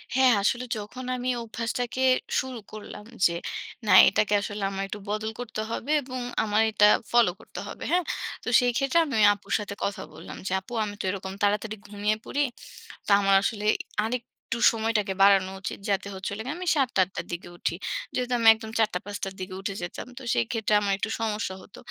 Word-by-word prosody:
হ্যাঁ, 260 -1 +6
আসলে 240 +5 +1
যখন 220 +5 -7
আমি 250 0 -2
অভ্যাসটাকে 235 +2 -3 0.4
শুরু 255 -2 -4
করলাম। 210 -1 -9 0.2
যে 170 - +3 0.5
না 195 - +5 0.2
এটাকে 210 +2 +1
আসলে 205 0 -4
আমার 195 0 -3
একটু 210 - -6
বদল 215 +1 -2
করতে 225 -3 -4
হবে 265 +5 -3
এবং 255 -1 -6 0.2
আমার 215 0 +2
এটা 210 -1 +5 0.3
ফলো 235 -6 +5
করতে - - -9
হবে। - - -8
হ্যাঁ? 355 +1 +3 0.4
তো - - -11
সেই 245 -1 +2
ক্ষেত্রে 275 +5 +3
আমি 285 - -5
ওই 210 - +7
আপুর 205 - -12
সাথে 205 -1 -5
কথা 200 - -2
বললাম, - - -9
যে - - -2
"আপু 195 +5 -12
আমি 205 -1 -5
তো - - -5
এরকম 190 0 -4
তাড়াতাড়ি 210 +1 +1
ঘুমিয়ে 205 +1 0
পড়ি। 290 - -1 0.7
তো - - -4
আমার 195 -1 +4
আসলে 210 0 -2 0.4
আরেকটু 235 +2 -2 0.5
সময়টাকে 220 -3 0
বাড়ানো 195 -1 +5
উচিত" 190 - -5
যাতে 200 0 0
হচ্ছে 190 +1 -4
হল 205 - -5
গিয়ে 295 +6 -3
আমি 365 - -5
৭ঃ০০ 270 -4 +3
টা - - +5
৮ঃ০০ 185 - -20
টার - - -4
দিকে 170 +1 -5
উঠি। - - -2 0.4
যেহেতু 250 0 -1
আমি 230 - +5
একদম 220 0 -9
৪ঃ০০ 220 -1 +4
টা - - +1
৫ঃ০০ 205 0 -6
টার 195 0 -6
দিকে 185 0 -5
উঠে 200 0 -3
যেতাম। 175 +7 -6
তো - - -11
সেই 120 - +2
ক্ষেত্রে 220 -2 0
আমার 200 -1 0
একটু 215 - -2
সমস্যা 210 -3 -2
হত। 195 - -15
215 Hz, 205 wpm, -26 LUFS, 200-240 Hz, 0.7 s, ওই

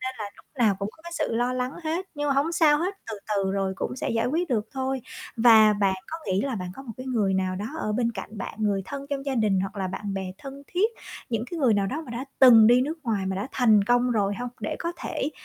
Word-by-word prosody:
Nên 255 - -4
là 260 - -2 0.2
lúc - - -19
nào 220 -5 +4
cũng 200 - -2
có 320 - -22
cái 340 0 -9
sự - - -1
lo 245 +2 +1
lắng 255 +1 -2
hết, 335 +4 -2
nhưng 290 0 -2
mà 275 - +2
hổng 285 +5 +1
sao 305 -3 +4
hết, 370 +5 -1 0.2
từ 215 - -5 0.2
từ 195 -1 +1
rồi 195 -1 0
cũng - - -3
sẽ - - -2
giải 230 0 +1
quyết 330 +7 0
được 220 -4 0
thôi. 265 -1 -2 0.4
Và 225 -2 +7
bạn 200 -2 +1
có 325 - -5
nghĩ 190 -1 +1
là 270 +1 -2
bạn 180 -4 -4
có 270 - -9
một 245 -4 -8
cái 255 - -8
người 215 -7 +1
nào 185 -1 0
đó 205 +3 -4
ở 215 - -2
bên 235 +1 0
cạnh 210 +1 -8
bạn, - - -5
người 205 -3 +1
thân 280 +6 -6
trong 275 -1 -2
gia 275 - 0
đình 210 -5 +2
hoặc 195 +2 -4
là 195 -1 -1
bạn 195 +2 -4
bè 190 -1 -4
thân 275 0 -9
thiết, 390 +5 +1 0.4
những 230 -1 -1
cái 345 - -4
người 255 -7 +4
nào 200 -1 +1
đó 290 +11 -3
mà - - -8
đã 240 +3 -4
từng 235 -4 +9
đi 245 +2 +6
nước 310 +5 -3
ngoài 210 -5 -1
mà 190 0 -2
đã 200 +6 -3
thành 220 -6 +4
công 245 +3 +3
rồi 205 -3 +1
hông? 245 +3 -4
Để 215 - -3
có 340 - -3
thể, 285 - -3
235 Hz, 280 wpm, -26 LUFS, 205-275 Hz, 0.4 s, từng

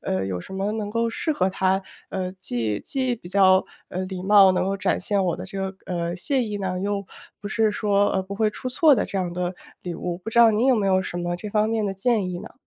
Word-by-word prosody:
呃， 95 0 -1
有 95 -2 -3
什 - - -11
么 195 +2 -1
能 215 -2 -3
够 230 +1 0
适 310 +7 -1
合 190 -9 +1
他， 190 0 +1 0.3
呃， 185 -1 -3
既 115 - -2
既 260 -3 -1
比 175 -6 -12
较， 190 -1 +5 0.2
呃， 185 - -4
礼 185 -1 -5
貌 195 -1 +7
能 185 - +1
够 195 +1 -1
展 - - 0
现 200 0 0
我 175 - +1
的 - - -7
这 195 0 -7
个， - - -24
呃， 170 -1 -2
谢 260 +7 0
意 210 -2 -4
呢？ 185 -2 -2
又 200 0 -2 0.4
不 205 - -5
是 220 -1 +2
说， 205 -1 +2
呃， 190 - 0
不 195 +1 -7
会 215 0 +1
出 255 - -5
错 290 +4 +5
的 - - 0
这 - - -5
样 175 -2 -2
的 180 +1 -2 0.3
礼 175 -1 -5
物。 175 +1 -4
不 205 - -8
知 230 - 0
道 235 -1 +8
您 220 +4 +2
有 265 - +5
没 205 - 0
有 190 -1 +3
什 180 - -5
么 175 0 -2
这 210 +4 -7
方 215 +1 +1
面 225 -2 0
的 195 - -2
建 205 -1 +1
议 175 - -4
呢？ - - -10
195 Hz, 285 characters per minute, -24 LUFS, 185-215 Hz, 0.4 s, 道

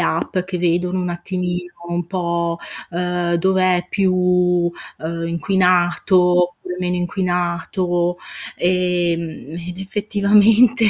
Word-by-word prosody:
app 165 +2 0
che 180 0 -4
vedono 180 +1 0
un 180 -1 -2
attimino 180 0 -4 0.2
un 175 -1 -2
po', 170 -2 -1 0.3
uhm, 175 0 -1
dov'è 185 0 +2
più, 190 -2 +1
uhm, 180 -2 0
inquinato, 180 +2 +2 0.3
oppure 180 0 -4
meno 180 0 -1
inquinato, 175 0 -1 0.4
ehm, 175 -4 0 0.2
ed 180 +1 -7
effettivamente 210 +4 +3
180 Hz, 100 wpm, -20 LUFS, 175-185 Hz, 0.4 s, effettivamente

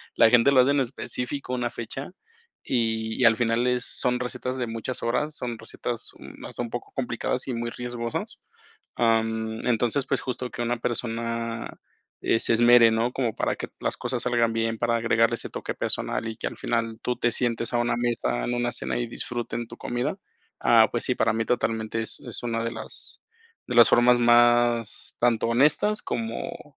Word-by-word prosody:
la 115 - +6
gente 125 +3 +5
lo 130 - +5
hace 130 - +3
en 145 -1 +3
específico 130 +1 -3
una 120 -1 -2
fecha, 135 +7 -5 0.5
y 110 -2 0
y - - +5
al 115 -1 +7
final 120 0 +1
es 125 0 +1
son 125 0 0
recetas 125 +1 -3
de 120 -2 -2
muchas 115 +2 -4
horas, 150 +6 0
son 120 -2 -4
recetas, 115 +1 -5
uh, - - -20 0.2
no - - -9
sé, - - -5
un 120 - -3
poco 120 - -6
complicadas 125 0 -2
y 130 - -2
muy 120 0 -2
riesgosas. 120 -1 -4 0.6
Ah, 115 -1 +4
mm, 110 +1 -4
entonces, 120 +3 +1
pues - - +1
justo 125 -1 -4
que 120 - -5
una 120 +1 0
persona, 115 -1 -3 0.4
eh, 115 - +2
se - - +3
esmere, 120 0 +7
¿no?, 115 +2 +1
como 120 -5 -1
para - - 0
que - - -6
las - - -1
cosas 125 -2 -3
salgan 120 -2 +2
bien, 115 0 -1
para 115 +1 +1
agregarle 115 0 +2
ese - - -4
toque - - -5
personal 115 - -2
y 110 - -5
que - - -3
al - - -7
final 115 -1 -2
tú 125 - -2
te 120 - +1
sientes 115 -1 -1
a - - +2
una 120 0 +1
mesa, 120 - -1
en 120 - -1
una 120 0 0
cena - - -2
y 120 -1 -2
disfruten 120 0 -3
tu 120 - -11
comida. 125 +10 -2 0.4
Ah, - - +5
pues - - -1
sí, - - +1
para - - +2
mí 115 0 -1
totalmente 115 -2 -1
es 115 - -2
es - - -6
una 115 -1 -1
de 115 - -2
las - - -6 0.5
de 125 - -3
las 120 -1 +8
formas 120 0 +5
más 120 -1 +3
tanto 115 -2 +2
honestas, 150 - +3
como 135 +6 -5
120 Hz, 195 wpm, -25 LUFS, 115-125 Hz, 0.6 s, las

